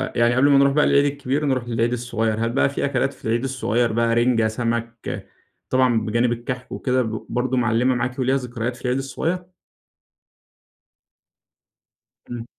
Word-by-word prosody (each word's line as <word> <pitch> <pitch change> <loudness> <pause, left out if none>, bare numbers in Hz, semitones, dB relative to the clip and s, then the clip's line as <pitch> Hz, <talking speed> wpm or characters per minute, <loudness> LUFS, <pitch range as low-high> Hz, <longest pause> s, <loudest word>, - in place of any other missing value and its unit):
يعني 120 0 +3
قبل 140 +3 +4
ما 140 - +6
نروح 140 0 +4
بقى 150 - +3
للعيد 140 0 +4
الكبير 140 +1 -1
نروح 130 -3 0
للعيد 115 0 0
الصغير، 115 -2 -1
هل - - 0
بقى 135 +3 +2
في 140 - -2
أكلات 140 0 0
في - - -17
العيد 115 +3 0
الصغير 120 -3 0
بقى 115 0 +2
رنجة، 120 -2 +3
سمك، 115 0 -3 0.4
طبعًا 130 -3 +3
بجانب 120 +2 +1
الكحك 125 +2 -5
وكده 130 -1 0 0.3
برضو 125 +2 -1
معلمة 120 +2 +2
معاكِ 125 +2 -2
وليها 130 +1 +2
ذكريات 120 -1 -4
في - - -15
العيد 125 +1 +1
الصغير؟ 160 +7 -3 2.8
إمم. 120 -1 -6
125 Hz, 155 wpm, -22 LUFS, 115-130 Hz, 2.8 s, ما